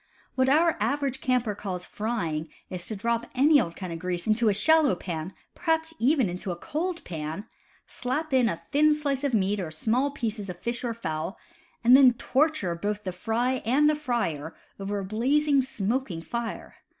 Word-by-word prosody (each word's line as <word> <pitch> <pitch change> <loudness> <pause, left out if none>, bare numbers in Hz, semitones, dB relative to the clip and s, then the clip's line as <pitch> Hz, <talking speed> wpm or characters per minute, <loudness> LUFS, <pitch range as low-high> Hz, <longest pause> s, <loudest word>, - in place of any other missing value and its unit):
What 260 0 +2
our 325 +4 +4
average 280 -2 -1
camper 250 -4 +1
calls 185 -3 -5
"frying" 170 -9 -3 0.2
is 180 -2 -3
to 220 - -3
drop 235 +3 -1
any 285 +2 +6
old 170 -5 -4
kind 185 -3 -5
of 165 - -6
grease 180 0 -2
into 220 +1 +3
a - - +4
shallow 300 +4 +4
pan 170 -1 -5 0.2
(perhaps 320 -2 0
even 265 -2 +3
into 180 +2 -5
a - - -3
cold 340 - -3
pan!), 160 +4 -5 0.4
slap 290 +4 -3
in 250 -3 +4
a 165 -4 -5
thin 300 +1 +5
slice 285 -2 -2
of 275 -4 +1
meat, 200 0 +1
or 175 -4 -3
small 230 - 0
pieces 225 -7 -3
of 180 - -6
fish 235 +4 -3
or 235 -2 -2
fowl, 160 -3 -4 0.5
and 245 +2 +8
then 260 -2 +7
torture 260 - +1
both 205 +4 -3
the 185 - -3
fry 235 +7 -1
and 270 +7 +3
the 305 - +4
frier 235 - -2 0.3
over 200 +1 -3
a 195 - -3
blazing, 275 +7 +2
smoking 225 -6 -2
fire. 235 +2 -5
235 Hz, 185 wpm, -27 LUFS, 185-275 Hz, 0.5 s, and